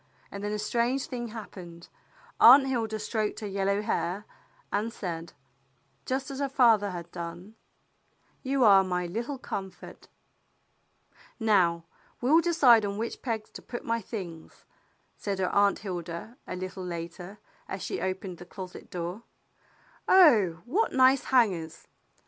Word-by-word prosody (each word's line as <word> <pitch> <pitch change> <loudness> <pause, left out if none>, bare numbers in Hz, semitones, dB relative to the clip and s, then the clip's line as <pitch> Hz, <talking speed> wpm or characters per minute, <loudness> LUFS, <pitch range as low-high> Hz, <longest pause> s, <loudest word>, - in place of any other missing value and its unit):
And 200 0 -7
then 205 - -2
a 210 - -1
strange 235 +5 0
thing 240 -2 -5
hap 220 -1 -8
pened. 170 -2 -11 0.5
Aunt 265 +3 +9
Hilda 225 -5 -1
stroked 215 0 -2
her 210 - -4
yellow 200 +1 0
hair, 205 -2 -2 0.5
and 215 +3 -1
said, 170 -5 -6 0.7
just 265 +1 -2
as 270 - -6
her 280 -1 -1
father 230 -6 +4
had 170 -2 -7
done, 175 +4 -7 0.4
*' - - -40
You 275 -2 +3
are 195 -3 +7
my 180 -1 -2
little 235 +10 -4
com 195 -6 -5
fort." 180 - -14 1.3
"Now 180 -7 +3 0.4
we'll 300 +7 +4
decide 275 -10 +5
on 200 0 -3
which 230 +2 -4
pegs 225 -4 -4
to - - -10
put 240 - -7
my 230 0 0
things," 180 -7 -8 0.5
said 200 -2 -3
her 185 -1 -1
Aunt 200 0 +4
Hilda, 175 +4 -6
a - - -4
little 185 +1 -6
later, 175 +2 -7 0.3
as 190 - -5
she - - -4
opened 185 -1 -4
the 175 - -10
closet 185 -2 -9
door. 175 +4 -5 0.9
"Oh, 220 - +5
what 390 - 0
nice 260 +1 +4
hangers! 185 -11 +1
205 Hz, 150 wpm, -28 LUFS, 180-235 Hz, 1.3 s, Aunt